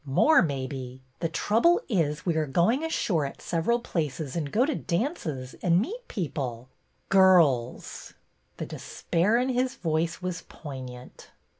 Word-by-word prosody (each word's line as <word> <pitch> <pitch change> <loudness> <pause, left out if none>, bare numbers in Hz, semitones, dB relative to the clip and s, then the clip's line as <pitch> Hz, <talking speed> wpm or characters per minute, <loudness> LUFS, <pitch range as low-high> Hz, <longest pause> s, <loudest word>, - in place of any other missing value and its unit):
More, 150 - +4
maybe. 130 -4 -4 0.2
The 165 - -1
trouble 225 - +3
is 160 - 0
we 170 -3 +1
are 155 -1 0
going 180 - +2
ashore 195 - 0
at 140 - -5
several 170 +8 0
places 155 - -3
and 150 -4 -2
go 240 +5 +3
to 305 - 0
dances, 170 - -3
and 175 -1 +3
meet 455 - -4
people 130 - -4 0.2
— - - -43
girls! 170 -11 +3 0.2
" - - -43
The - - -4
despair 190 +7 0
in 250 +2 +1
his 255 +1 0
voice 165 -5 -1
was 180 -2 -4
poignant. 130 -4 -9
165 Hz, 150 wpm, -27 LUFS, 140-220 Hz, 0.2 s, More